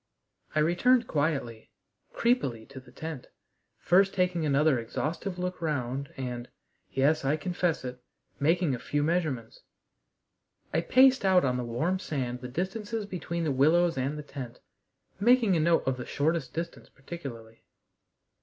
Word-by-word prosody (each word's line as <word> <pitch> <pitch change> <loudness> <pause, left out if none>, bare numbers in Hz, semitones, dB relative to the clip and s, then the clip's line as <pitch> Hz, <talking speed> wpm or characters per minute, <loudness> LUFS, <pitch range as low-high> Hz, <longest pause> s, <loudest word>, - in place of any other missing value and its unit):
I - - +3
returned 230 +10 +3
quietly, 140 -7 -1 0.4
creepily, 135 - 0
to 135 -1 -9
the 130 -1 -17
tent, 160 -1 -7 0.5
first 195 +3 +3
taking 180 -4 +1
another 140 -1 +3
exhaustive 165 - -3
look 180 0 -3
round 140 -3 -2
and 125 -2 -5 0.4
yes, 145 +4 +2
I 140 +3 +1
confess 175 -2 -1
it 125 0 -6 0.4
making 165 0 +2
a 125 - -3
few 145 +4 -1
measurements. 150 -8 -1 1.1
I - - +2
paced 260 +7 +5
out 185 -3 +4
on 125 -1 +1
the 125 - -2
warm 155 +11 -1
sand 125 -7 -3
the 125 - -5
distances 205 - -3
between 170 -3 -4
the 155 - 0
willows 165 +6 +3
and 135 +3 -2
the 150 - -6
tent, 130 -4 -8 0.6
making 230 -2 +4
a - - +2
note 165 +2 +3
of 130 -1 0
the 125 - -6
shortest 155 -1 0
distance 165 +1 -6
particularly. 135 -7 -9
155 Hz, 145 wpm, -28 LUFS, 130-180 Hz, 1.1 s, paced